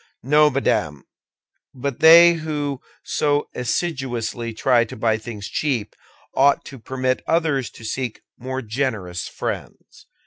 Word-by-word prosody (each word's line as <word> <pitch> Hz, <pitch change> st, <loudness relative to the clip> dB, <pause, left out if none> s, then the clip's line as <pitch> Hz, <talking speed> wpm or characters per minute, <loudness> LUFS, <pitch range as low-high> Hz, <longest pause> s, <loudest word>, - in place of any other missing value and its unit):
"No, 150 Hz, +4 st, +5 dB
madame; 75 Hz, -, -1 dB, 0.7 s
but 135 Hz, 0 st, -4 dB
they 170 Hz, +2 st, +9 dB
who 150 Hz, -4 st, -3 dB, 0.2 s
so 145 Hz, 0 st, 0 dB
assiduously 125 Hz, -4 st, -2 dB
try 120 Hz, +2 st, +3 dB
to 115 Hz, -, -8 dB
buy 110 Hz, 0 st, +1 dB
things 110 Hz, -3 st, -7 dB
cheap 125 Hz, -9 st, -2 dB, 0.4 s
ought 140 Hz, +1 st, +3 dB
to 135 Hz, -, -10 dB
permit 130 Hz, +2 st, -2 dB
others 155 Hz, -6 st, +1 dB
to 115 Hz, -, -13 dB
seek 120 Hz, +1 st, -4 dB
more 130 Hz, +1 st, -5 dB
generous 110 Hz, -7 st, -3 dB
friends." -, -, -7 dB
130 Hz, 125 wpm, -22 LUFS, 115-145 Hz, 0.7 s, they